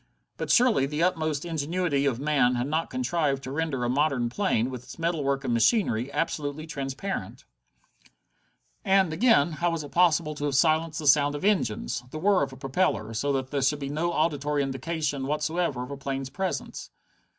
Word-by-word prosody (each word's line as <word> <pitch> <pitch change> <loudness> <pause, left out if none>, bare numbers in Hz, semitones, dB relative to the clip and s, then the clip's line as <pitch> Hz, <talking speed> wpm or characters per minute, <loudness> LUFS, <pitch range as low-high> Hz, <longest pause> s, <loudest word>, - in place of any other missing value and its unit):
But - - -4
surely 240 - +4
the 150 +3 -1
utmost 155 -4 0
ingenuity 160 -2 0
of 125 -3 -1
man 140 -4 +2
had 120 +1 -1
not 155 +3 -1
contrived 165 - -1
to 130 - -6
render 145 -4 -2
a - - 0
modern 135 -3 +1
plane, 130 - 0
with 125 -2 -6
its - - -12
metalwork 145 -5 -1
and 125 -3 -1
machinery, 120 - +2
absolutely 150 -1 -2
transparent? 140 - -5 1.4
And, 190 -4 +3
again, 180 - +4
how 170 +3 0
was 165 -2 -3
it 145 - -10
possible 170 -3 +3
to 145 -1 -4
have 145 -2 -1
silenced 160 +2 +2
the 155 - -4
sound 145 0 +4
of 145 - -4
engines, 120 - 0
the 155 - -7
whir 195 +3 +3
of 135 -1 -1
a 130 - -11
propeller, 120 - -1
so 140 +6 -1
that 130 -1 -2
there 140 -1 0
should 135 +3 +2
be 140 -1 -5
no 160 +4 -1
auditory 150 -3 0
indication 140 0 -3
whatever 150 -2 -1
of 125 - -8
a 140 - -5
plane's 135 -1 -4
presence? 190 +6 -4
145 Hz, 185 wpm, -26 LUFS, 135-165 Hz, 1.4 s, surely